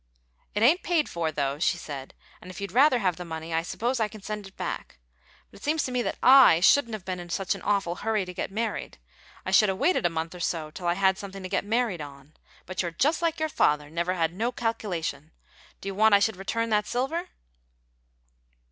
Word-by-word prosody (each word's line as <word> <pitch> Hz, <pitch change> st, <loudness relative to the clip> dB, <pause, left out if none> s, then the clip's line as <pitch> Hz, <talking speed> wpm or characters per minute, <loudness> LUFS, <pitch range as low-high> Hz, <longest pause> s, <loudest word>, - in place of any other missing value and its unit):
"It 210 Hz, -, +1 dB
ain't 315 Hz, +10 st, +5 dB
paid 335 Hz, -4 st, +1 dB
for, 165 Hz, -2 st, -2 dB
though," 140 Hz, -1 st, -2 dB
she 175 Hz, -, +2 dB
added; 135 Hz, -3 st, -7 dB, 0.3 s
"and 180 Hz, -, -11 dB
if 180 Hz, -, -9 dB
you'd 200 Hz, 0 st, -5 dB
rather 260 Hz, +1 st, +5 dB
have 185 Hz, -7 st, 0 dB
the 180 Hz, -, -6 dB
money, 160 Hz, -1 st, -6 dB
I 165 Hz, -, +2 dB
suppose 235 Hz, +8 st, -2 dB
I 220 Hz, -, +2 dB
can 210 Hz, -2 st, -13 dB
send 210 Hz, -1 st, -5 dB
it 195 Hz, -, -18 dB
back. 65 Hz, -, -5 dB, 0.5 s
But -, -, -15 dB
seems 310 Hz, +1 st, 0 dB
to 255 Hz, -, -3 dB
me 250 Hz, -1 st, 0 dB, 0.2 s
I 260 Hz, -10 st, +8 dB
shouldn't 230 Hz, +5 st, +4 dB
have 195 Hz, -4 st, -10 dB
been 185 Hz, -1 st, -3 dB
in 175 Hz, 0 st, -9 dB
such 190 Hz, +2 st, -1 dB
an -, -, -9 dB
awful 195 Hz, -4 st, 0 dB
hurry 215 Hz, -3 st, 0 dB
to 180 Hz, -, -8 dB
git -, -, -3 dB
married; 220 Hz, +2 st, -3 dB, 0.5 s
I 185 Hz, -, -2 dB
should 210 Hz, +1 st, +5 dB
'a' 190 Hz, -, 0 dB
waited 280 Hz, -, +2 dB
a -, -, -2 dB
month 165 Hz, 0 st, -4 dB
or 180 Hz, -, -9 dB
so, 160 Hz, -3 st, -2 dB
till 175 Hz, +2 st, -6 dB
I 175 Hz, -, +2 dB
had 190 Hz, 0 st, +2 dB
something 195 Hz, -1 st, -8 dB
to 185 Hz, -, -5 dB
git 195 Hz, +1 st, -1 dB
married 220 Hz, -5 st, 0 dB
on. 140 Hz, 0 st, -11 dB, 0.3 s
But 185 Hz, +1 st, -3 dB
you're 175 Hz, -, -2 dB
just 290 Hz, -, +1 dB
like 335 Hz, -1 st, 0 dB
your 315 Hz, -, +1 dB
father 150 Hz, -, +1 dB
never 170 Hz, +3 st, -1 dB
had 165 Hz, -1 st, 0 dB
no 225 Hz, +6 st, -1 dB
calculation. 175 Hz, -, -3 dB, 0.5 s
Do -, -, -7 dB
you 195 Hz, -, -2 dB
want 215 Hz, +1 st, +5 dB
I -, -, +5 dB
should 210 Hz, +1 st, +1 dB
return 230 Hz, +4 st, -2 dB
that 210 Hz, -1 st, +2 dB
silver?" 305 Hz, +9 st, -2 dB
195 Hz, 230 wpm, -27 LUFS, 170-230 Hz, 0.5 s, I